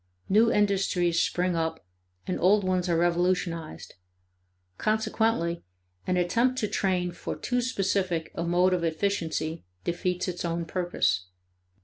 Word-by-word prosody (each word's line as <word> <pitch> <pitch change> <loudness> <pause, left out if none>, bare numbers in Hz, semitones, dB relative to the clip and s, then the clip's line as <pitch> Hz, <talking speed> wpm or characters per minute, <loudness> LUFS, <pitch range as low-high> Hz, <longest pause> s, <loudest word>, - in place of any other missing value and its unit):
New 225 +4 +4
industries 190 -4 +2
spring 180 0 0
up, 160 - -2 0.4
and 185 - -2
old 200 +3 +4
ones 185 -1 0
are 170 - +2
revolutionized. 170 - 0 0.9
Consequently 215 -5 0 0.5
an 180 - +1
attempt 235 +9 +2
to 215 - 0
train 180 -3 0
for 175 - -5
too 245 0 -1
specific 195 -8 -1
a 170 - -3
mode 180 +2 +3
of 175 -2 0
efficiency 165 -2 -1 0.2
defeats 180 +1 -1
its 180 -1 -4
own 170 0 -2
purpose. 165 - 0
180 Hz, 125 wpm, -27 LUFS, 170-195 Hz, 0.9 s, New